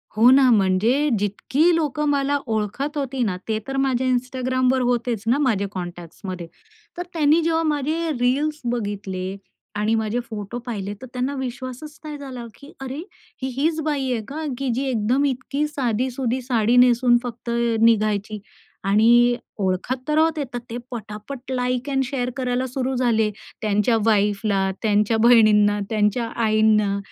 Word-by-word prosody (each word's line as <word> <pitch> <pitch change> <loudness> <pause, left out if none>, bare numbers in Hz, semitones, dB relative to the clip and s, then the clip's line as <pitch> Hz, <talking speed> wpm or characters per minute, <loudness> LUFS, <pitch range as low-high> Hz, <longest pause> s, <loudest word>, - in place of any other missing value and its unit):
हो 230 +3 +6
ना 265 -1 +6
म्हणजे 220 +8 +3
जितकी 265 - +1
लोकं 300 -2 -1
मला 285 0 +1
ओळखत 225 +7 -2
होती 270 -2 -2
ना, 185 -4 -1
ते 220 -1 0
तर 270 0 -3
माझ्या 260 -1 +1
Instagramवर 255 +1 +1
होतेच 240 -3 0
ना 245 +4 +3
माझे 225 -9 +1
कॉन्टॅक्ट्समध्ये. 175 0 -7 0.5
तर 355 - -2
त्यांनी 310 0 +3
जेव्हा 330 0 +1
माझे 310 +2 -1
रील्स 290 +5 0
बघितले 200 -4 -4 0.4
आणि 215 +2 +1
माझे 220 +2 -1
फोटो 210 +1 -5
पाहिले 205 -4 -4
तर - - -7
त्यांना 255 +2 -1
विश्वासच 260 +3 -6
नाही 300 -1 -6
झाला, 255 -4 -7
की 280 +1 -13
अरे 270 +1 -5 0.4
ही 260 - -1
हीच 315 +4 0
बाई 280 -4 -1
आहे 230 -3 -1
का, 310 +3 -5
की 275 -1 -2
जी 260 - -1
एकदम 245 +4 +1
इतकी 275 +2 -1
साधी-सुधी 255 -1 -1
साडी 240 -2 +1
नेसून 245 0 +5
फक्त 240 -1 -7 0.3
निघायची? 215 -2 +2 0.5
आणि 240 +4 +5 0.2
ओळखत 200 +7 -1
तर 300 - +1
राहत 320 0 +3
येतात 250 -4 -3
ते 235 - -4
पटापट 240 +4 -7
लाइक 250 +1 -1
एंड 270 -1 +1
शेअर 250 -2 -2
करायला 255 0 -1
सुरू 260 +1 -2
झाले. 225 -4 +2 0.3
त्यांच्या 210 +2 +2
वाईफला, 205 -2 +2
त्यांच्या 210 0 +2
बहिणींना, 210 -3 +5
त्यांच्या 220 +2 +1 0.2
आईंना 215 -2 +3
245 Hz, 150 wpm, -22 LUFS, 215-270 Hz, 0.5 s, हो